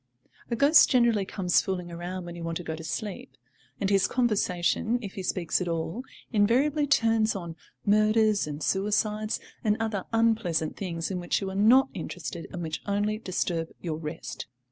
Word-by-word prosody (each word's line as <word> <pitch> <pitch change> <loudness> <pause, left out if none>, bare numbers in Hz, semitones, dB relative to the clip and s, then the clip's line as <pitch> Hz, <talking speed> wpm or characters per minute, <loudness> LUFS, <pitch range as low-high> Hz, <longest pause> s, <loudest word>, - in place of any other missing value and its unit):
A 235 - 0
ghost 285 +6 +6
generally 235 -5 +3
comes 185 -2 +1
fooling 180 -2 -4
around 175 +2 -5
when 175 0 -7
you 170 - -7
want 165 0 -2
to 175 - -7
go 160 -1 -4
to 160 - -9
sleep, 160 -5 -5 0.4
and 195 - 0
his 195 -1 +4
conversation, 220 -2 +1
if 200 -5 -7
he 195 - -5
speaks 180 -1 -1
at 180 - -2
all, 165 +7 -3 0.3
invariably 270 +8 +3
turns 225 -5 +3
on 170 -4 -6 0.3
murders 215 -1 +3
and 150 0 -5
suicides 210 +2 0 0.2
and 210 -2 +2
other 215 -4 -2
unpleasant 220 -9 +1
things 170 -2 -4
in 185 - -2
which 175 -1 0
you 195 -1 -4
are - - -7
not 240 +7 +6
interested, 170 -1 -6
and 175 -2 -5
which 160 -1 -4
only 205 +1 0
disturb 175 -5 -2
your 160 -3 -3
rest. 160 +1 -6
195 Hz, 175 wpm, -27 LUFS, 170-220 Hz, 0.4 s, ghost